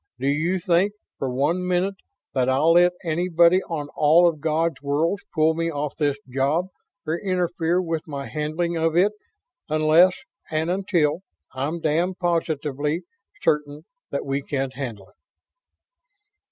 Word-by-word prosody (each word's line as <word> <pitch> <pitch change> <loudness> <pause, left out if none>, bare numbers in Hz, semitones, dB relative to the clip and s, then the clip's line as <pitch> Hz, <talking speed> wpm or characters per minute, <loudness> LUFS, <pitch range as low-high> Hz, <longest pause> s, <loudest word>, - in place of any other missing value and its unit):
"Do 130 - -4
you 155 +7 +1
think, 180 +3 +2 0.3
for 135 - -1
one 150 +8 0
minute, 180 +2 +1 0.4
that 130 -1 +1
I'll 140 +5 +3
let 175 +1 +5
anybody 170 +2 +3
on 150 -3 -3
all 160 +4 +5
of 165 -3 -1
God's 160 +1 0
worlds 155 +7 0
pull 160 -1 +3
me 165 +1 -1
off 145 -2 -3
of - - -37
this 145 -2 +1
job 140 +8 0 0.4
or 160 +2 -1
interfere 175 -2 0
with 165 -3 -3
my 140 -2 -5
handling 155 +3 -2
of 165 0 +1
it 195 +4 +4 0.6
unless 155 +4 +5 0.3
and 160 +2 0
until 175 -4 +1 0.3
I'm 145 +6 -3
damned 170 +5 0
positively 155 -2 -1 0.4
certain 150 +1 0 0.2
that 140 - -3
we 135 +1 -1
can't 135 -2 -3
handle 115 -8 -6
it?" - - -28
160 Hz, 145 wpm, -23 LUFS, 145-175 Hz, 0.6 s, let